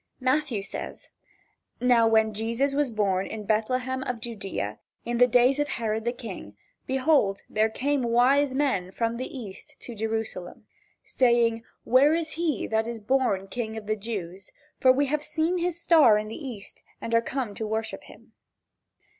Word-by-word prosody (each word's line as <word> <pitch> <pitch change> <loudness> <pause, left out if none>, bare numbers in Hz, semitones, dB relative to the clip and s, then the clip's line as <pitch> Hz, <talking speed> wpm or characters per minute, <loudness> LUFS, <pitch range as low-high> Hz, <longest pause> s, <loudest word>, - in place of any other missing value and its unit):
Matthew 255 -5 0
says: - - -7 0.7
"Now 240 -2 +4
when 220 -1 +3
Jesus 230 +6 0
was 285 -1 +1
born 200 -4 0
in 215 -1 -6
Bethlehem 255 +5 0
of 250 -3 -3
Judea, 195 - -5 0.3
in 240 0 -2
the 250 - +7
days 250 +3 +4
of 290 - +1
Herod 225 -3 -2
the 240 - +1
King, 195 - -9 0.3
behold 265 -7 +2
there 215 +1 +1
came 280 +5 0
wise 255 +4 +3
men 260 -11 0
from 230 +4 -2
the 255 - -4
east 200 -6 -10
to 240 - -7
Jerusalem. 220 -4 -4 0.4
"Saying, 235 -2 +2 0.2
where 275 +6 +5
is 330 -1 -2
he 320 -7 -1
that 220 0 0
is 235 -1 -5
born 210 -4 0
king 220 +2 -4
of 220 - -7
the 215 +1 0
Jews? 195 -3 -6 0.3
for 260 - +6
we 280 +3 +2
have 295 +2 -1
seen 320 +4 0
his 345 -1 -2
star 310 -11 +6
in 215 0 -3
the 270 +6 -7
east 215 -6 -9 0.2
and 230 - -5
are 230 - +5
come 245 -3 -3
to 220 +1 -4
worship 220 +1 -3
him." - - -17
235 Hz, 170 wpm, -26 LUFS, 215-265 Hz, 0.7 s, the